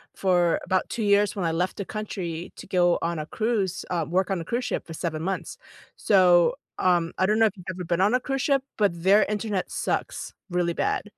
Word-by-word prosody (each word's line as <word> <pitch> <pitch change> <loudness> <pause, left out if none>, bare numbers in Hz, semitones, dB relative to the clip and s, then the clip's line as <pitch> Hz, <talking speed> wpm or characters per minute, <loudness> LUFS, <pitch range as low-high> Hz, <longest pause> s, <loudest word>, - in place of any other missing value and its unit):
for 175 -3 +2
about 185 0 0
2 230 - -3
years 205 0 +3
when 190 -4 -2
I 165 - +1
left 175 +3 -1
the 200 - -4
country 180 -6 -5
to - - -10
go 175 -2 +3
on 170 -1 -1
a 155 - -4
cruise 200 -2 -1
um, 165 -3 -1
work 190 +2 +1
on 190 - 0
a 165 - -6
cruise 240 +6 -2
ship - - -3
for 165 - -7
7 160 -1 -3
months. 190 +2 -3 0.4
So, 185 +3 +4 0.2
um, 175 -2 +2
I 185 - +3
don't 210 +3 +2
know 225 - +6
if 210 -2 0
you've 180 - -12
ever 185 -1 -5
been 170 +1 0
on 205 +4 +3
a 250 - +3
cruise 270 +1 -2
ship, 275 -1 +2
but 170 -5 0
their 200 +3 +5
internet 210 -2 -2
sucks, - - -3 0.2
really 175 -1 0
bad. - - -1
185 Hz, 225 wpm, -25 LUFS, 175-210 Hz, 0.4 s, know